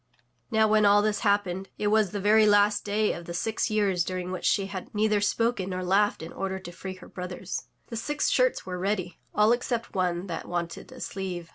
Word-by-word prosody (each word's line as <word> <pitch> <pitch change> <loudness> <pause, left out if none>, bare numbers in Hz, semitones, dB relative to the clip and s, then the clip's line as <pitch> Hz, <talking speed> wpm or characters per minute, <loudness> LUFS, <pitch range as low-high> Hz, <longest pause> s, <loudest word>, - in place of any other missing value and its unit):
^ - - -46
^^^^j^^ - - -47 0.4
Now 220 -2 +3
when 215 0 +4
all 205 0 +6
this 215 -1 +1
happened, 195 -2 0
it 210 - 0
was 215 -2 +3
the 205 - -4
very 215 +2 +5
last 205 0 +4
day 210 +1 +1
of 170 - -8
the 170 - -6
six 220 +5 -1
years 200 -5 +2
during 185 0 -4
which 185 - -4
she 195 - +2
had 195 -1 -6
neither 210 0 +2
spoken 215 -2 0
nor 185 0 -3
laughed 195 -1 +2
in 160 - -8
order 190 0 -3
to 185 -2 -9
free 185 +2 -7
her 185 - -13
brothers. 180 0 -6 0.2
The 230 - -5
six 295 +6 -1
shirts - - +2
were 180 -1 -4
ready, 185 -2 -2 0.2
all 210 +1 +5
except 240 -1 -1
one 180 -1 0
that 170 -4 -5
wanted 170 -1 -4
a - - -11
sleeve. 180 -3 -5
200 Hz, 225 wpm, -27 LUFS, 185-215 Hz, 0.4 s, all